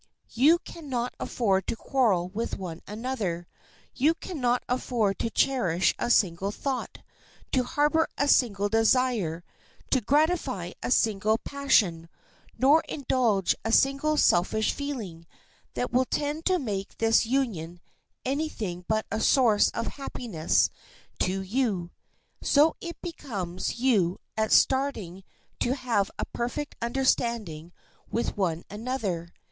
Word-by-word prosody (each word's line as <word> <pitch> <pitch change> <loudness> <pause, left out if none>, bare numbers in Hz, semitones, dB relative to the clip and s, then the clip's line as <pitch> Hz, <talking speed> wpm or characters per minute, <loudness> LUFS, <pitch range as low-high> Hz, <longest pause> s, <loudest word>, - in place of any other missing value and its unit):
You 290 +9 +5
can 335 -3 -11
not 245 -1 -2
afford 195 -6 0
to - - -1
quarrel 220 -9 +1
with 220 +5 -3
one 170 -3 -7
another. 210 -6 -3 0.5
You 305 +5 +2
can 345 -4 -7
not 245 0 +2
afford 235 -5 0
to 230 - -1
cherish 190 -9 +2
a 240 - -1
single 190 -4 +2
thought, 265 +3 -4 0.5
to 260 - +3
harbor 300 +4 +2
a 285 - +1
single 205 -7 +3
desire, 225 -6 +1 0.5
to 260 - +3
gratify 275 - +1
a - - -3
single 220 -2 +2
passion, 205 -13 +1 0.5
nor 285 +5 +5
indulge 240 - +1
a 225 - -1
single 275 +5 +3
selfish 220 0 +3
feeling, 215 - -6 0.5
that 245 - -2
will 255 +1 +3
tend 295 +4 -2
to 370 -1 +3
make 200 - -4
this 225 0 +3
union 200 -10 -1 0.5
any 290 +4 0
thing 180 - -5
but 220 0 0
a 220 - -1
source 230 -6 +4
of 230 - -3 0.2
happiness 210 -12 0 0.5
to 190 +1 0
you. 195 -5 -1 0.5
So 300 +3 +4
it 340 -1 -7
becomes 200 - -4
you 210 -9 +2 0.2
at 220 0 0
starting 220 -10 +2 0.4
to 250 +2 +1
have 235 -7 0
a - - -2
perfect 245 +5 -4
understanding 235 -9 -1 0.4
with 235 - -2
one 175 -5 -1
another. 205 -6 -3
230 Hz, 130 wpm, -27 LUFS, 195-270 Hz, 0.5 s, You